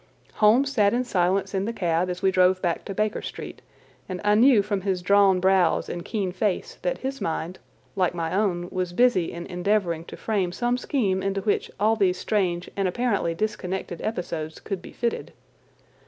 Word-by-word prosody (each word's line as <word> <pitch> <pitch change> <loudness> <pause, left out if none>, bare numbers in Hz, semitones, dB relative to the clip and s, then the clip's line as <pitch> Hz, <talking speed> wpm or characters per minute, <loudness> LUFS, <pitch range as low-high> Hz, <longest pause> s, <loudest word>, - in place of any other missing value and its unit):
Holmes 240 +6 +4
sat 210 -4 +3
in 250 - +1
silence 195 -3 0
in 195 0 0
the 230 - -2
cab 175 -3 0
as 180 +1 -5
we 190 - +4
drove 185 0 +4
back 175 -3 -2
to 195 - -5
Baker 215 +1 0
Street, - - -8 0.5
and 185 -1 -4
I 210 0 +3
knew 230 -1 +6
from 200 -1 -2
his 185 -2 -1
drawn 195 -1 +5
brows 190 -1 +2
and 175 - -5
keen 200 -3 -2
face 190 +1 -2
that - - -1
his 270 +1 -5
mind, 165 +2 -3 0.4
like 180 -2 +1
my 165 -1 -2
own, 185 -3 0
was 185 -2 -2
busy 200 -6 +3
in 170 0 -7
endeavouring 180 -2 -1
to - - -10
frame 200 -5 -1
some 245 +4 0
scheme 205 -10 0
into 195 0 -1
which 205 +1 0
all 215 +2 +3
these 190 -4 +2
strange 185 -4 -1
and 195 -1 0
apparently 200 -4 0
disconnected 190 -3 -3
episodes 170 -7 -4
could 195 -3 -5
be - - -11
fitted. 235 0 -3
190 Hz, 185 wpm, -25 LUFS, 180-215 Hz, 0.5 s, knew